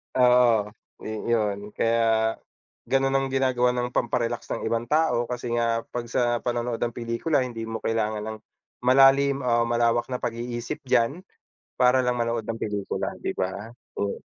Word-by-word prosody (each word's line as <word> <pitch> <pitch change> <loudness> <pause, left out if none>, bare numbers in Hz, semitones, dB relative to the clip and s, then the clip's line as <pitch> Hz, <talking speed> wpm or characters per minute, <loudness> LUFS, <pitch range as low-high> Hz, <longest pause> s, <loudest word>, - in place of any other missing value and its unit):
Oo, 125 -4 +4 0.3
ni - - -5 0.2
yun 105 -2 -1
kaya 115 -1 +2 0.5
ganun 135 0 +2
ang 135 - 0
ginagawa 130 -2 +1
ng 125 0 -2
pamparelax 120 -1 -1
ng - - -6
ibang 115 0 -1
tao, 150 -6 +2
kasi 125 -1 -4
nga 115 -1 +1
pag 120 -1 -4
sa 120 0 +1
panonood 120 -1 -2
ng 120 -1 -2
pelikula 120 +5 0
hindi 115 -3 -5
mo 110 0 -5
kailangan 110 -1 -1
ng 110 0 -5 0.4
malalim 135 +2 +5
o 120 -1 +2
malawak 120 0 +1
na 125 -1 -4
pag-iisip 120 0 -4
diyan, 120 +7 +2 0.6
para 125 +1 +4
lang 125 - +1
manood 115 -2 -1
ng 115 0 -4
pelikula, 105 -2 -2
di - - -3
ba? 100 +4 -4 0.3
Oh. 100 0 -2
120 Hz, 155 wpm, -25 LUFS, 115-125 Hz, 0.6 s, malalim